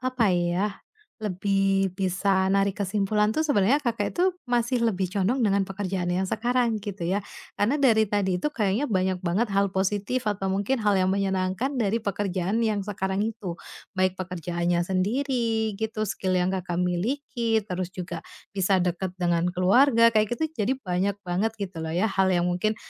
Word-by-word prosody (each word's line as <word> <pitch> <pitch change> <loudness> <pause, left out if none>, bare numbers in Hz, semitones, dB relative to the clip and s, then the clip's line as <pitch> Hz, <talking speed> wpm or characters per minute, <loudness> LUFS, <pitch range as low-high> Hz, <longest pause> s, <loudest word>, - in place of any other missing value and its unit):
apa 255 -2 0
ya, 180 +4 0 0.4
lebih 195 -2 0
bisa 190 0 +1
narik 195 0 +2
kesimpulan 210 +2 +1
tuh 310 - 0
sebenarnya 280 -3 +3
Kakak 230 -6 -1
itu 360 0 +1
masih 240 0 +1
lebih 190 -5 0
condong 200 +7 0
dengan 200 -3 +2
pekerjaan 190 -2 -3
yang 190 +1 0
sekarang, 240 +1 +1
gitu 200 -4 -5
ya. 200 +2 0 0.3
Karena 250 +9 +1
dari 225 -5 +5
tadi 195 -3 0
itu 300 +11 -2
kayaknya 215 +2 0
banyak 185 -5 0
banget 200 +7 +1
hal 195 -1 +1
positif 205 +5 -1
atau 195 -2 -1
mungkin 200 +7 0
hal 210 -4 +1
yang 185 -1 +2
menyenangkan 190 +5 0
dari 220 +1 0
pekerjaan 195 +1 -1
yang 210 -3 0
sekarang 190 0 -1
itu. 210 -6 -4 0.4
Baik 185 -1 +2
pekerjaannya 175 -1 -2
sendiri, 225 +3 0
gitu, 220 -1 -1
skill 185 -2 -1
yang 180 +1 +1
Kakak 180 -2 -3
miliki, 230 +3 -1
terus 185 -3 -3
juga 175 -2 -5 0.3
bisa 195 -1 +2
deket 180 0 -1
dengan 175 -1 +1
keluarga, 230 +6 +4
kayak 215 +2 +2
gitu. 315 -1 -2
Jadi 250 0 0
banyak 195 -4 -1
banget 200 +6 -1
gitu 190 -5 -5
loh 160 +1 -3
ya, 195 +2 +1
hal 190 -1 +3
yang 175 -2 +2
mungkin, 180 +5 0
200 Hz, 165 wpm, -26 LUFS, 185-225 Hz, 0.4 s, dari